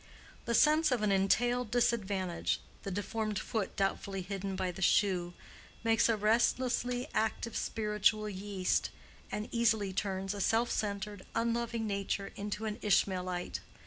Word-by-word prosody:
The 235 - +1
sense 305 +2 +5
of 240 -4 +1
an 210 - +3
entailed 240 +5 +2
disadvantage—the 200 -6 -1
deformed 210 +2 -2
foot 215 -1 -2
doubtfully 195 -1 -1
hidden 195 +1 -4
by 185 -1 -1
the 190 - -9
shoe, 180 -3 +2 0.5
makes 225 0 +3
a 225 - +3
restlessly 245 +3 +1
active 220 +1 -1
spiritual 215 0 +1
yeast, 195 -2 -1 0.4
and 210 +1 -3
easily 220 -4 +2
turns 195 0 -2
a 200 - -4
self 225 +5 +2
centered, 205 -1 -3
unloving 235 0 0
nature 200 -1 -2
into 210 +2 -4
an 210 -1 -3
Ishmaelite. 185 -3 0
210 Hz, 130 wpm, -32 LUFS, 195-230 Hz, 0.5 s, sense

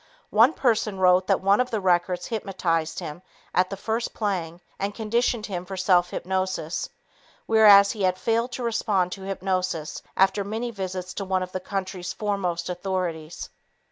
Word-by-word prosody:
One 230 +8 +6
person 225 -7 +1
wrote 185 0 +4
that 195 - +2
one 200 +4 +4
of 250 - -1
the 220 - -1
records 180 -1 +1
hypnotized 175 -7 -1
him 165 -1 -6 0.3
at 185 0 +2
the 195 - -5
first 225 +4 -2
playing 175 -6 -2 0.2
and 200 +1 -2
conditioned 230 0 0
him 180 -4 -4
for 190 +1 -7
self 180 -1 +3
hypnosis, 185 -3 -2 0.6
whereas 205 -3 +7
he 210 - -6
had 185 -1 +2
failed 230 +4 0
to 250 - -4
respond 210 -6 0
to 195 - -6
hypnosis 185 -4 -2 0.2
after 195 +1 +3
many 225 +4 -3
visits 185 -3 -5
to 200 - -4
one 190 -1 0
of 185 - -7
the 185 - -3
country's 185 -2 -4
foremost 185 -5 -2
authorities. 175 -3 -4
190 Hz, 165 wpm, -25 LUFS, 180-210 Hz, 0.6 s, whereas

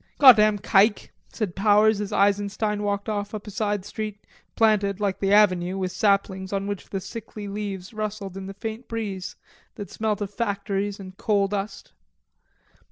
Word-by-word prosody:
"Goddam 215 -6 +7
kike!" 205 +1 +3 0.2
said 205 -7 -3
Powers 210 +1 +4
as 205 - -4
Eisenstein 205 +1 +1
walked 205 0 -2
off 205 0 -3
up 210 - -7
a 210 - -8
side 205 -1 -1
street, 215 -1 -6 0.3
planted, 205 -3 +2
like 200 -2 -1
the 195 0 0
avenue, 185 -3 +4
with 185 -1 -2
saplings 195 -1 +1
on 195 0 -1
which 200 -1 -5
the 195 - -3
sickly 210 +2 -8
leaves 200 -1 -5
rustled 210 -3 -4
in 195 0 -6
the 195 - -8
faint 225 +3 -6
breeze 200 -5 -4 0.4
that 205 - -8
smelt 215 -2 -1
of 205 -1 -4
factories 200 -1 -2
and 185 -1 -10
coal 200 -2 +2
dust. 200 +1 -5
205 Hz, 165 wpm, -25 LUFS, 195-215 Hz, 0.4 s, Goddam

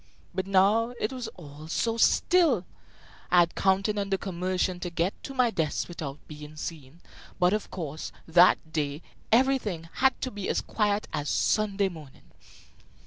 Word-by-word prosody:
But 190 +1 -2
now 210 +5 +3
it 215 - -1
was 250 -2 -5
all 150 -2 -11
so 225 +7 0
still! 285 - +3 0.6
I 180 - +6
had 170 -1 +1
counted 195 +2 +1
on 200 0 -2
the 195 - +1
commotion 185 0 -2
to 175 0 -4
get 170 +3 0
to 275 - -8
my 250 -3 +3
desk 160 -7 -1
without 150 -5 -6
being 150 0 -10
seen; 155 0 -8 0.4
but, 180 +2 +4
of 215 - -2
course, 160 -4 -5 0.2
that 165 -1 +4
day 145 0 -2 0.3
everything 225 -9 +2
had 265 +1 +3
to 255 - -2
be 205 -2 -5
as - - +1
quiet 210 -1 0
as 145 0 -2
Sunday 205 -2 +1
morning. 155 -7 -12
185 Hz, 160 wpm, -27 LUFS, 160-215 Hz, 0.6 s, I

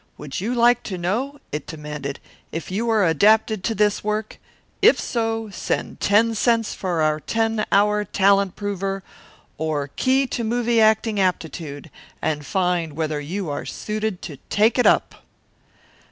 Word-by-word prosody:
Would 150 +4 -6
you 235 +5 -1
like 240 0 +4
to 185 - -4
know," 230 +12 -2
it 150 -1 -4
demanded, 150 -3 -6 0.3
"if 165 +2 -5
you 225 +5 -1
are 215 -3 +3
adapted 210 +4 +3
to 225 - 0
this 210 -1 +1
work? 215 0 -3 0.4
If - - +6
so, 225 -2 -2
send - - -3
ten 225 +3 +3
cents 225 0 +1
for 175 -4 -1
our 155 0 +1
Ten 225 +4 0
Hour 210 +1 +3
Talent 200 0 +2
Prover, 195 -1 -3 0.6
or 150 -3 -1
Key 265 - +2
to 245 -2 -3
Movie 235 0 +1
Acting 220 -1 +3
Aptitude, 160 -6 -2 0.3
and 150 -1 -2
find 180 -4 0
whether 155 -1 -2
you 170 +2 -4
are 145 - -3
suited 215 -3 -4
to 150 -5 -7
take 220 +4 +3
it 245 - +5
up." - - +2
200 Hz, 155 wpm, -22 LUFS, 165-225 Hz, 0.6 s, If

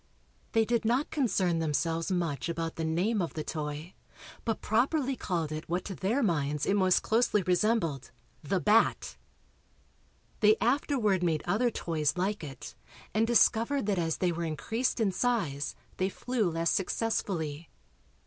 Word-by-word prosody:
They 225 -1 +4
did 235 +1 0
not 245 +6 +1
concern 190 - +1
themselves 165 +3 -1
much 170 -4 -1
about 165 -1 -3
the 165 - -3
name 185 +7 +1
of 170 - -3
the 155 - -3
toy, 150 +2 -5 0.5
but 225 - -1
properly 265 +4 +1
called 170 -9 -2
it 155 +1 -6
what 175 +2 -1
to 200 - -4
their 220 +9 0
minds 150 -6 0
it - - +2
most 185 -3 +3
closely 220 -3 +2
resembled 175 - +1 0.3
"the 180 +5 0
bat." 215 +4 +2 1.2
They 215 -1 +6
afterward 240 - +1
made 165 -3 0
other 215 +7 +2
toys 160 -7 -1
like 195 +1 -1
it 135 -4 -8 0.4
and 220 +1 +2
discovered 235 +2 +3
that 200 -3 0
as 165 -2 -1
they 180 -2 +1
were 170 0 -3
increased 225 +11 -1
in 215 -4 +2
size 180 - -1 0.2
they 190 +1 +1
flew 230 -1 -1
less 165 0 0
successfully. 175 -7 -2
185 Hz, 150 wpm, -29 LUFS, 165-225 Hz, 1.2 s, They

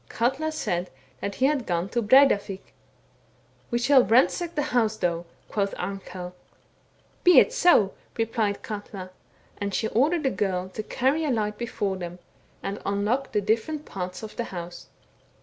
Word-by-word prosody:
Katla 270 +7 0
said 180 - -2 0.3
that 200 +6 -4
he 260 - +2
had 275 -4 +1
gone 175 0 0
to 240 - 0
Breidavik. 210 -5 +3 0.5
' - - -35
We 240 - 0
shall 260 +2 +5
ransack 260 - +2
the 295 - +1
house 220 -3 +2
though,' 170 -2 -1 0.2
quoth 200 -2 -1
Arnkell. 185 -2 -6 0.5
* - - -36
Be 360 - +7
it 485 - +6
so,' 350 - +4 0.2
replied 225 -2 -1
Eatia, 200 -3 -7 0.5
and 200 -1 -2
she 220 - 0
ordered 300 +7 +2
a 265 - +3
girl 185 -2 -1
to 190 - -5
carry 270 +8 0
a 305 - 0
light 210 -4 -1
before 205 -5 -2
them, 175 -1 -6 0.5
and 200 - -4
unlock 210 +7 0
the 210 - +1
different 230 +9 -1
parts 180 +1 -6
of 215 - -8
the 235 - -1
house. 175 -1 -8
215 Hz, 165 wpm, -26 LUFS, 190-265 Hz, 0.5 s, Be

